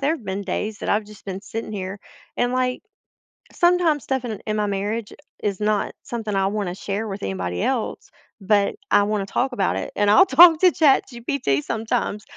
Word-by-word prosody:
there 285 +3 +2
have 235 - -16
been 190 +1 -3
days 205 +2 -3
that - - -5
I've 210 +1 +1
just 210 -1 -15
been 190 -1 -5
sitting 220 +2 -6
here, 195 0 -5 0.4
and, 245 0 +1
like, 255 0 -1 0.7
sometimes 345 -4 +2
stuff 265 -2 -2
in 220 -4 -5
in 215 - 0
my 210 -1 0
marriage 205 +2 -3 0.3
is 200 -2 -1
not 210 -1 0
something 220 -4 -4
I 195 0 +2
wanna 200 -3 -2
share 205 +3 -4
with 195 -1 -6
anybody 90 -2 -3
else, - - -2 0.3
but 200 0 +2 0.2
I 205 - +5
wanna 205 -1 -1
talk 255 +6 -1
about 195 - 0
it, - - -4
and 205 0 +2
I'll 215 - +7
talk 335 -3 +8
to 365 -1 +6
ChatGPT 245 - +1
sometimes, 220 -2 -2
210 Hz, 190 wpm, -22 LUFS, 195-245 Hz, 0.7 s, talk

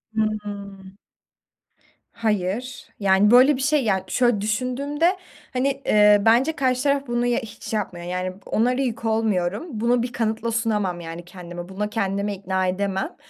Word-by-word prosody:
Hıı. 210 -2 -3 1.4
Hayır. 220 +3 -2
Yani, 200 +1 +4
böyle 255 +4 +7
bir 260 - -5
şey, 285 +1 +2
yani, 195 -4 +1
şöyle 240 -5 +2
düşündüğümde, 275 - 0 0.4
hani, 270 +2 0
eee, 210 -1 +5
bence 240 +7 +4
karşı 255 -3 0
taraf 280 -1 +2
bunu 240 0 0
y 245 0 +1
hiç 225 -1 -9
yapmıyor, 180 -5 -3
yani, 180 +1 -3
onlara 250 +4 +1
yük 235 -3 -3
olmuyorum. 210 - 0
Bunu 235 -1 +1
bir 245 - -4
kanıtla 225 0 -1
sunamam 210 -6 0
yani 170 0 -8
kendime. 175 -1 -9
Buna 205 +2 -3
kendimi 200 -1 -1
ikna 190 -1 -1
edemem 195 - -2
220 Hz, 145 wpm, -23 LUFS, 195-245 Hz, 1.4 s, böyle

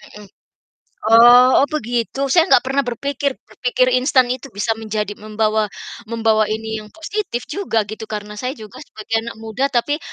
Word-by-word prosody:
mhm. 210 - -11 0.8
Oh 240 +2 +8
oh, 280 - +3
begitu. 240 -1 -3
Saya 340 -2 +5
gak 250 - +5
pernah 270 +1 0
berpikir 280 +3 -2 0.2
berpikir 255 0 0
instan 260 0 +3
itu 255 +2 -5
bisa 225 +2 0
menjadi 210 -1 -3
membawa 215 0 0 0.4
membawa 225 -1 +2
ini 220 0 -3
yang 210 - -11
positif 330 - -4
juga, 390 - -2
gitu, 220 0 -7
karena 210 0 -6
saya 255 +3 -3
juga 220 +3 -12
sebagai 215 +1 -5
anak 235 0 -8
muda 225 +5 -2
tapi 285 +4 -1
235 Hz, 160 wpm, -19 LUFS, 220-265 Hz, 0.8 s, Oh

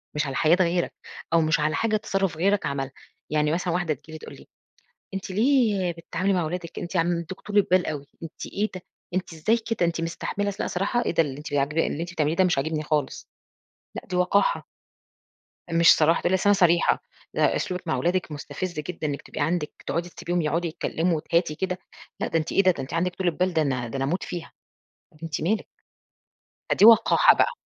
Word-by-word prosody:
مش 150 +1 0
على 135 - -4
حياة 160 +4 +4
غيرك. 175 0 +1 0.4
أو 165 - +5
مش 155 0 +2
على 155 +1 +1
حاجة 220 -1 +1
تَصرُّف 195 -5 -1
غيرك 195 +4 +2
عملها. 135 -1 -2 0.4
يعني 150 0 +1
مثلًا 175 +1 -1
واحدة 175 -3 0
تيجي 150 +3 -14
لي - - -5
تقول - - -11
لي: - - -16 0.7
"أنتِ 195 0 -5
ليه 215 -4 +2
بتتعاملي 170 +3 -2
مع 180 -2 +1
ولادِك، 170 +1 -5
أنتِ 175 +2 -6
عندِك 170 +1 -1
طولة 205 -1 +2
بال 185 0 +4
أوي، 145 -2 -4 0.2
أنتِ 165 - -7
إيه 210 +2 -2
ده، 185 - -6 0.3
أنتِ 185 -1 -2
إزاي 190 +9 +2
كده؟ 225 -5 -1
أنتِ 170 0 -1
مستحملة" 200 +4 -2
لأ - - -1
صراحة، 200 +7 -1
إيه - - +1
ده 165 - +3
اللي 140 -3 -5
أنتِ 150 0 -8
ب - - +2
عاجب 140 +3 0
اللي 165 -1 0
أنتِ 175 +1 -5
بتعمليه 155 -1 0
ده 190 - +4
مش 180 -4 +2
عاجبني 155 +2 -1
خالص، 150 -3 -2 0.7
لأ - - -6
دي 180 - -3
وقاحة. 180 +3 +2 1.1
مش 165 -1 +6
صراحة، 160 +2 +3
تقول 175 - +1
لي: - - +4
:أصل 190 +2 +2
أنا - - +7
صريحة، 175 -3 +3 0.3
لأ - - +2
أسلوبِك 180 -1 -3
مع 160 - +1
ولادِك 175 +5 0
مُستفز 150 +4 -5
جدًا 160 0 -4
إنِّك 140 -1 -3
تبقى - - -7
عندِك 155 0 -2
تقعدي 170 +1 -2
تسبيهم 175 0 -2
يقعدوا 165 +3 0
يتكلّموا 165 +1 -1
وتهاتي 165 0 0
كده 180 +2 -2 0.4
لأ - - -1
ده 165 - +1
أنتِ 160 - -4
إيه 195 - +3
ده؟ 185 - +6
ده 155 - -5
أنتِ 130 - -8
عندِك 175 +2 0
طولة 185 -2 0
بال، 180 +3 0
ده 160 - +2
أنا 130 -5 -1
ده 115 - -8
أنا 135 - 0
أموت 170 +7 -1
فيها." 175 -2 -6 0.7
أنتِ 165 -2 -3
مالِك. 205 +7 0 1.0
فدي 205 - +5
وقاحة 230 - +7
بقى. - - +3
170 Hz, 210 wpm, -25 LUFS, 155-185 Hz, 1.1 s, أنا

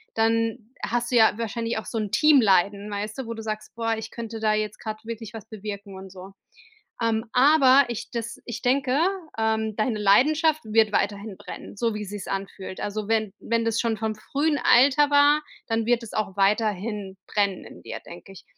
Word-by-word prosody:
dann 225 +1 +1 0.3
hast 240 +3 -2
du - - +1
ja 220 - +6
wahrscheinlich 230 0 -2
auch - - -9
so 230 - -4
'n 210 -2 -3
Teamleiden, 205 -6 +4
weißt 210 +2 -4
du, 265 - -4
wo 230 - -4
du 225 - -7
sagst: 215 -1 -5
„Boah, 225 -1 0
ich 220 0 -7
könnte 230 -1 -6
da 215 -1 +2
jetzt 215 -1 -2
gerade 215 -1 -5
wirklich 225 -2 -7
was 225 -1 -9
bewirken 205 -2 -7
und 190 -1 -10
so.“ 190 +1 -11 0.7
Ähm, 225 0 +1
aber, 270 0 +6
ich 235 -2 -5
das 230 -1 -4
ich 235 -1 -5
denke, 265 +1 +2 0.4
ähm, 220 -1 0
deine 215 0 0
Leidenschaft 305 - +4
wird 215 -1 +3
weiterhin 205 0 -1
brennen, - - -9
so 230 -2 0
wie 210 0 -4
sich's 205 0 -7
anfühlt. 195 -1 -5
Also, 210 0 -4
wenn 220 -3 +1
wenn 230 0 0
das 230 0 0
schon 230 -2 0
vom 220 -1 -2
frühen 290 +7 -1
Alter 280 +4 +5
war, 290 +1 +5 0.3
dann 225 0 0
wird 240 0 +2
es 230 - -9
auch 205 -3 -2
weiterhin 205 -1 0
brennen 200 -3 0
in - - -13
dir, - - -7
denke 175 +3 -12
ich. 195 - -14
220 Hz, 195 wpm, -25 LUFS, 205-235 Hz, 0.7 s, ja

